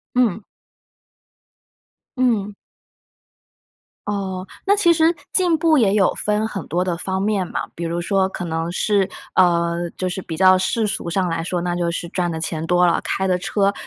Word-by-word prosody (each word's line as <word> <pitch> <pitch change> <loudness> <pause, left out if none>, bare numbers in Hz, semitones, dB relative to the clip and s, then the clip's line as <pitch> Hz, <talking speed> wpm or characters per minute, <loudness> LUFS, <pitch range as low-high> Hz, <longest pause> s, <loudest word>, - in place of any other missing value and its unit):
嗯。 220 -5 +2 1.7
嗯。 215 -5 +1 1.5
哦， 190 -2 -3 0.2
那 405 +1 +4
其 345 -4 +4
实 325 +1 +3 0.2
进 355 -3 +3
步 315 -2 +3
也 205 -4 +3
有 195 -3 +3
分 210 +1 0
很 195 -6 -6
多 180 +4 0
的 175 -2 -1
方 190 +2 -3
面 200 -3 0
嘛， - - -2
比 170 - -5
如 170 +1 -2
说 190 +1 +1
可 180 - -6
能 165 0 -2
是， 195 +1 +1 0.3
呃， 170 -1 +2
就 185 - -2
是 190 - -4
比 165 -3 -6
较 185 +1 +6
世 215 +4 0
俗 185 - -3
上 185 +2 0
来 165 0 -2
说， 175 +1 -2
那 175 -1 -1
就 175 -1 -1
是 170 0 -4
赚 175 -2 -1
的 160 - -4
钱 160 0 -3
多 180 0 +4
了， 170 - +2
开 190 - -1
的 180 -1 +1
车 200 +2 +1
185 Hz, 190 characters per minute, -21 LUFS, 175-210 Hz, 1.7 s, 较